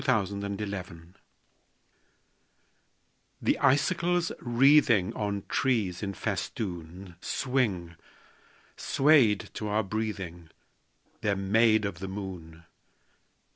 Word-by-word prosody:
SILVER 100 -6 0
FILIGREE 95 -4 -5 2.4
The - - +1
icicles 170 +5 +2
wreathing 120 -5 +4
On 100 -2 -3
trees 110 -9 0
in 100 -2 -4
festoon 95 - -5
Swing, 105 -11 -1 0.8
swayed 135 -8 +3
to 105 - -4
our 105 +1 +1
breathing: 95 -5 -4 0.7
They're 105 -2 +1
made 110 +2 +3
of 95 -4 -4
the 95 - -5
moon. 90 -4 -7
100 Hz, 85 wpm, -28 LUFS, 95-120 Hz, 2.4 s, wreathing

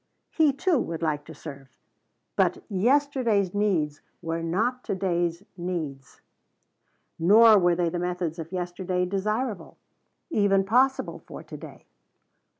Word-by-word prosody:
He, 315 -3 +4
too, 315 +2 +1
would 165 -6 -4
like 150 -2 -1
to 160 - -11
serve. 140 -3 -10 0.7
But - - +1
yesterday's 235 -3 +2
needs 175 -8 0 0.2
were 165 0 -2
not 220 +10 -1
to - - -1
day's 175 -1 -1
needs, 160 -7 -5 1.0
nor 215 +5 +7
were 175 -1 +3
the 175 0 -1
methods 175 -2 -3
of 165 +1 -7
yesterday 180 0 -2
desirable, 210 +3 -3 0.5
even 200 -6 +3
possible, 255 +7 +1
for - - -9
to - - -10
day. - - -11
185 Hz, 125 wpm, -26 LUFS, 165-215 Hz, 1.0 s, nor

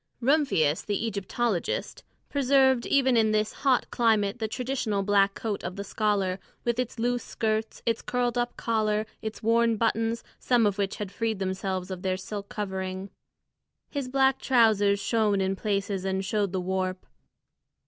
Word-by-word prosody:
Rumphius, 250 - +2
the 205 +2 -1
Egyptologist, 205 -1 -2 0.2
preserved 265 -2 +3
even 265 -2 +3
in 220 -1 +4
this 215 0 +1
hot 265 -3 +2
climate 220 -2 +2
the 220 - -1
traditional 240 -4 -2
black 195 0 +3
coat 215 -3 -3
of 180 +1 -4
the 200 - -4
scholar 200 -2 0 0.2
with 235 0 0
its 250 0 -2
loose 245 +1 0
skirts, 220 0 -2
its 230 -1 0
curled 245 -1 -1
up 240 0 -1
collar, 215 -2 0 0.2
its 220 0 -6
worn 230 0 +3
buttons, 225 +1 0 0.2
some 240 -3 +3
of 205 0 0
which 200 -1 0
had 205 -2 -5
freed 220 +1 -1
themselves 190 -1 -3
of 185 -1 -5
their 185 0 0
silk 200 +1 -6
covering. 190 -1 -4 0.8
His 280 -3 -3
black 265 0 +3
trousers 215 -5 +4
shone 210 -1 +1
in 190 0 0
places 200 -1 -1
and 190 0 -1
showed 205 -2 0
the 185 -1 -1
warp. 185 0 -2
215 Hz, 160 wpm, -27 LUFS, 195-235 Hz, 0.8 s, in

